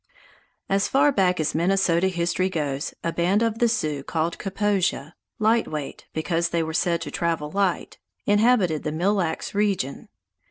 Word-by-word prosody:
As 195 0 +1
far 285 +2 +4
back 185 -7 +2
as 155 - 0
Minnesota 180 +1 +2
history 175 +1 0
goes, 145 -5 -3
a 170 - -1
band 185 +6 +2
of 225 -1 -1
the 240 - +4
Sioux 155 -11 -1
called 165 +3 -2
Kaposia 195 -6 -1 0.2
(Light 220 +2 +2
Weight, 150 -3 -6
because 165 +1 -1
they 170 -1 0
were 160 0 -4
said 170 0 +1
to - - -5
travel 165 -3 -2
light) 195 -3 -1 0.3
inhabited 205 -7 +3
the 155 - -3
Mille 175 +6 +1
Lacs 175 -6 -2
region. 200 -10 -1
175 Hz, 160 wpm, -24 LUFS, 160-200 Hz, 0.3 s, far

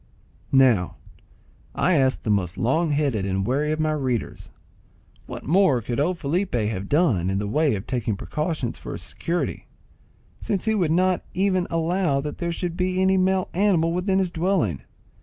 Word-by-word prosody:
Now, 125 -9 +4 0.8
I 185 - +2
ask 135 -4 +2
the 110 - 0
most 95 -4 0
long 160 +8 +1
headed 140 -8 0
and 95 0 -1
wary 145 +6 0
of 155 - -2
my 155 0 +1
readers, 130 -7 -3 0.8
what - - -7
more 165 -5 +3
could 120 +2 -3
old 175 +5 +1
Felipe 170 +3 -1
have 105 -4 -2
done 135 - +2
in 95 - 0
the 105 - -2
way 145 +3 +2
of 95 - -6
taking 115 -5 -2
precautions 150 - -3
for - - -7
his - - -7
security, 170 +1 -3 0.7
since 195 0 -2
he 220 - +2
would 180 -7 +1
not 185 +2 +2
even 185 -1 +1
allow 165 -2 +1
that 150 +1 -5
there 170 -1 -1
should 170 0 -3
be 185 +1 -1
any 190 0 +3
male 185 0 +1
animal 175 -4 +2
within 185 +2 0
his 185 -2 0
dwelling? 165 - 0
155 Hz, 175 wpm, -24 LUFS, 120-180 Hz, 0.8 s, Now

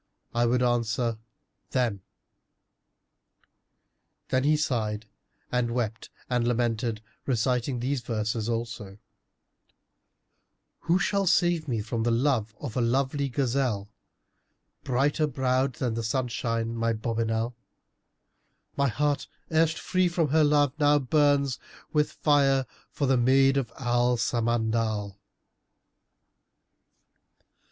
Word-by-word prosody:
'—I 120 0 +2
would 125 +1 +2
answer, 115 -1 0 0.5
'Them.'" 115 -6 0 2.3
Then 130 0 +1
he 150 +2 +3
sighed 110 -7 -1 0.5
and 125 -1 +1
wept 115 -3 -3 0.2
and 120 -1 0
lamented, 115 -2 -1 0.2
reciting 125 0 0
these 130 +2 -1
verses 110 0 -2
also, 115 -4 -4 1.8
"Who 170 +2 +2
shall 195 0 0
save 175 -2 +2
me 115 -5 -1
from 115 +2 -3
love 115 -1 +1
of 130 -7 -6
a 125 - +1
lovely 135 +4 0
gazelle, 125 -6 -1 0.5
* - - -49
Brighter 145 +4 +1
browed 130 -1 0
than 120 -1 -2
the 115 - -2
sunshine, 115 -1 -2
my 115 0 0
bonnibel! 115 +1 -1 1.2
My 140 0 +2
heart, 145 +4 0 0.2
erst 160 0 +2
free 185 -1 +1
from 170 -3 0
her 155 +2 +4
love, 145 -2 +3
now 145 0 +5
burns 140 -1 +2 0.2
* - - -23
With 150 -1 +2
fire 135 -3 +3 0.2
for 145 - -2
the 135 -1 +3
maid 135 +2 +4
of 130 -4 -1
Al 120 -1 +1
Samandal." 110 -3 -1
125 Hz, 110 wpm, -27 LUFS, 115-140 Hz, 2.3 s, now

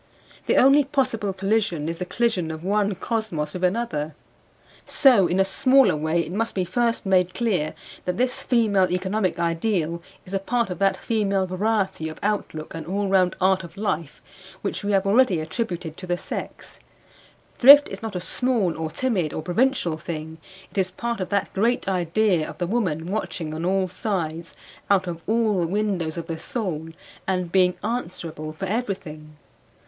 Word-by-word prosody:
The - - +3
only 275 +3 +6
possible 255 -7 0
collision 195 -5 0
is 165 0 -4
the 180 - -4
collision 225 -9 0
of 160 +1 -6
one 205 +1 +1
cosmos 190 -8 -3
with 185 - -5
another. 180 -7 -1 0.7
So 240 -10 +5
in 180 - 0
a 195 - +5
smaller 260 - +4
way 160 +3 0
it 165 - -6
must 225 +3 -2
be 185 -2 0
first 235 +5 0
made 185 -2 +2
clear 190 -10 0 0.3
that 180 0 -2
this 255 +1 0
female 210 -6 +2
economic 190 +1 0
ideal 170 -1 0 0.2
is 185 - -11
a 195 - +1
part 235 +1 -1
of 180 - -5
that 195 0 +2
female 200 -4 0
variety 190 -3 -1
of 155 - -9
outlook 200 -7 -2
and 160 -1 -7
all 200 +2 -1
round 185 -2 +3
art 190 0 +3
of 170 - -11
life 170 -7 -3 0.4
which 200 - -3
we 205 - 0
have 195 0 +2
already 200 -3 +4
attributed 170 -1 -4
to 185 - -8
the 175 0 0
sex: - - -7 0.8
thrift 285 +3 +9
is - - -7
not 220 -3 -5
a - - -1
small 215 -2 0
or 160 -1 -2
timid 180 - -1
or 155 - -4
provincial 180 - +1
thing; 160 -1 -6 0.3
it - - -2
is 185 -1 +2
part 235 +5 -4
of 185 - -3
that 200 -1 -1
great 230 +4 +1
idea 180 -1 +1
of - - -9
the 180 - -1
woman 175 -6 -1
watching 180 -5 -3
on 160 +1 -4
all 190 0 +1
sides 170 -4 -3 0.3
out 195 -2 +3
of 170 -2 -5
all 220 -2 +2
the 170 - 0
windows 185 -4 -1
of 170 - -4
the 165 -1 -5
soul 170 -9 -3 0.4
and 180 -2 -1
being 180 -1 +4
answerable 165 -9 -4
for 155 +5 -5
everything. 180 -8 -4
190 Hz, 175 wpm, -24 LUFS, 170-220 Hz, 0.8 s, thrift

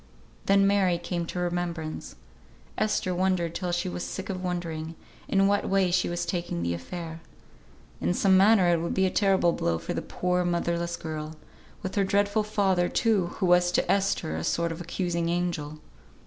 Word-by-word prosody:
Then 195 0 +5
Mary 195 -3 +3
came 175 0 -3
to - - -6
remembrance. 175 -3 -3 0.6
Esther 210 -4 0
wondered 180 -2 0
till 180 -1 -3
she 175 0 -1
was 90 0 -4
sick 90 - -5
of 185 -1 -5
wondering, 165 -3 -3 0.3
in 195 0 +3
what 200 +1 +1
way 190 -2 +2
she 180 0 +2
was 175 0 -2
taking 170 - -3
the 85 0 0
affair. 160 - -6 0.8
In 85 +2 0
some 190 -1 +4
manner 195 -1 +5
it 170 -1 +2
would 170 - -2
be 190 - +3
a 185 - +1
terrible 190 -4 +3
blow 85 - 0
for - - -4
the - - -2
poor, 180 0 -1
motherless 170 0 -1
girl; 155 -1 -6 0.5
with 190 - -4
her 200 - +2
dreadful 205 +2 +2
father, 195 -4 +1
too, 210 -6 +2
who 195 - -1
was 180 0 +4
to - - +2
Esther 195 - 0
a 80 - -3
sort 170 - 0
of 165 +1 -6
accusing 170 -1 -2
angel. 170 -4 -2
175 Hz, 180 wpm, -27 LUFS, 170-190 Hz, 0.8 s, Then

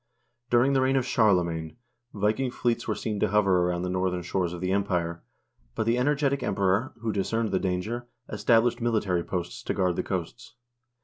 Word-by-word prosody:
During 125 +3 +4
the 135 - +3
reign 130 +1 +2
of 130 -2 +1
Charlemagne, 90 -8 +1 0.3
Viking 110 +6 0
fleets 120 -1 -1
were - - 0
seen 105 -3 -3
to - - +2
hover 100 -2 +3
around 90 0 0
the - - -2
northern 90 -1 -1
shores 90 0 -1
of 90 - -6
the 90 +1 -1
Empire, 90 -4 -1 0.5
but 110 - -1
the 115 +2 +2
energetic 140 0 +1
Emperor, 100 +5 0
who 115 -1 -1
discerned 110 +3 0
the - - +1
danger, 100 +6 -2 0.2
established 115 +3 +2
military 105 -7 +1
posts 90 -1 -4
to - - -3
guard 90 -2 +1
the - - +1
coasts. 95 +5 -5
105 Hz, 180 wpm, -27 LUFS, 90-120 Hz, 0.5 s, During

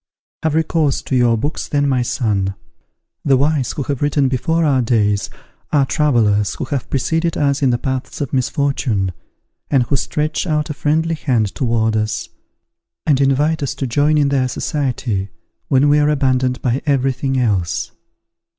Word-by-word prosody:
"Have 160 -1 0
recourse 160 -3 +1
to 130 - -2
your 120 -2 +3
books, 145 +8 -3
then, 145 -1 +1
my 130 -2 +1
son. 100 -6 -1 0.7
The 135 -3 +4
wise 145 -1 +1
who 145 - -3
have 140 -1 -3
written 145 -2 +2
before 160 +6 0
our 135 -4 +3
days 105 -5 +1 0.4
are 145 -3 +3
travellers 110 -6 +2
who - - -4
have 140 -4 -3
preceded 165 +5 0
us 140 -1 +1
in 135 - +3
the 120 - +2
paths 130 0 -4
of 140 -5 -4
misfortune, 130 -6 0 0.6
and 135 -4 +3
who 140 - -1
stretch 150 +3 -1
out 150 -1 0
a - - -2
friendly 160 +3 0
hand 120 -10 0
towards 115 -3 0
us, 110 +2 -2 0.8
and 140 -4 +3
invite 145 +4 +2
us 140 - -2
to 135 - -3
join 145 +5 +2
in 145 -2 +3
their 135 -2 +1
society, 125 -7 -2 0.4
when 135 +2 +3
we 145 +1 +4
are 150 0 +3
abandoned 130 -3 +1
by 125 +1 0
every 135 -2 +2
thing 135 +1 -2
else. 95 -9 0
135 Hz, 170 wpm, -18 LUFS, 120-145 Hz, 0.8 s, The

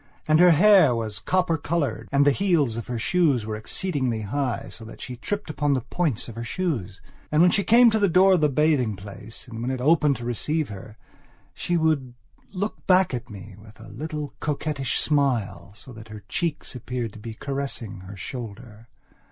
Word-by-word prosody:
And 155 +1 +4
her 180 0 +8
hair 175 - +6
was 110 -2 -3
copper 180 -3 0
coloured, 140 -9 -2
and 140 0 +4
the 145 - +6
heels 160 - +1
of 115 - -6
her 120 - -3
shoes 140 -2 +1
were 110 0 -3
exceedingly 130 - -2
high, 125 +4 -2
so 115 - -10
that 110 - -11
she 125 - -7
tripped 205 - -4
upon 145 -1 0
the 130 - -1
points 150 -3 -1
of 115 - -8
her 115 +2 -6
toes. 115 - -3 0.3
And 150 - +2
when 175 +1 +6
she 200 - +2
came 235 +2 +6
to 220 - +1
the 200 -2 +3
door 190 +3 +5
of 180 - +2
the 150 - +4
bathing 140 -6 +2
place, 100 +5 -10
and 115 -1 -7
when 120 - -2
it 130 -1 -2
opened 150 +1 +3
to 120 0 -7
receive 150 +5 -1
her, 105 +2 -10 0.6
she 175 - -1
would 150 -6 0 0.4
look 205 +2 -4
back 185 -4 +4
at 120 - -5
me 100 -1 -10
with 110 0 -16
a 110 - -12
little 150 -3 -5
coquettish 145 -2 -2
smile, 135 -11 0
so 125 +4 -11
that 110 -1 -11
her 105 -2 -10
cheek 170 -3 -2
appeared 120 -3 -4
to - - -11
be 110 +1 -8
caressing 135 -7 -5
her 95 +2 -10
shoulder. 115 0 -8
135 Hz, 200 wpm, -24 LUFS, 115-160 Hz, 0.6 s, her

